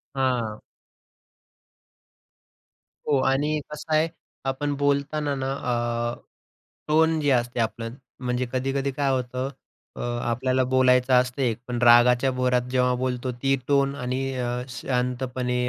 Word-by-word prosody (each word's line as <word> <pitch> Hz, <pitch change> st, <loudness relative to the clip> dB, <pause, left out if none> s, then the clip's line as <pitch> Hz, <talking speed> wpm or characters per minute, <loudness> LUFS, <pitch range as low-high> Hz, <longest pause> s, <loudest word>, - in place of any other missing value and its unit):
हां. 120 Hz, -5 st, 0 dB, 2.5 s
हो. 140 Hz, -2 st, +3 dB
आणि 145 Hz, +3 st, +1 dB
कसं 150 Hz, +1 st, -6 dB
आहे 155 Hz, +2 st, +3 dB, 0.4 s
आपण 145 Hz, +2 st, -2 dB
बोलताना 145 Hz, +1 st, +1 dB
ना 135 Hz, 0 st, -1 dB
अ, 120 Hz, -2 st, -1 dB, 0.7 s
टोन 160 Hz, +1 st, +3 dB
जे 145 Hz, -1 st, +1 dB
असते 120 Hz, -1 st, +1 dB
आपलं 115 Hz, 0 st, -2 dB, 0.3 s
म्हणजे 125 Hz, 0 st, -1 dB
कधी-कधी 135 Hz, +1 st, -1 dB
काय 140 Hz, 0 st, 0 dB
होतं 125 Hz, +1 st, -2 dB, 0.5 s
अ, -, -, -7 dB, 0.3 s
आपल्याला 130 Hz, +2 st, +1 dB
बोलायचं 130 Hz, 0 st, +3 dB
असतं 125 Hz, +2 st, +2 dB
एक, 120 Hz, -3 st, 0 dB
पण 120 Hz, -, -2 dB
रागाच्या 120 Hz, +2 st, +6 dB
भरात 125 Hz, -1 st, +1 dB
जेव्हा 125 Hz, -1 st, +2 dB
बोलतो 125 Hz, 0 st, -2 dB
ती 135 Hz, 0 st, +3 dB
टोन 140 Hz, -1 st, +3 dB
आणि 125 Hz, +1 st, -2 dB
अ, 125 Hz, -1 st, -2 dB, 0.2 s
शांतपणे 125 Hz, 0 st, -1 dB
130 Hz, 120 wpm, -25 LUFS, 125-135 Hz, 2.5 s, रागाच्या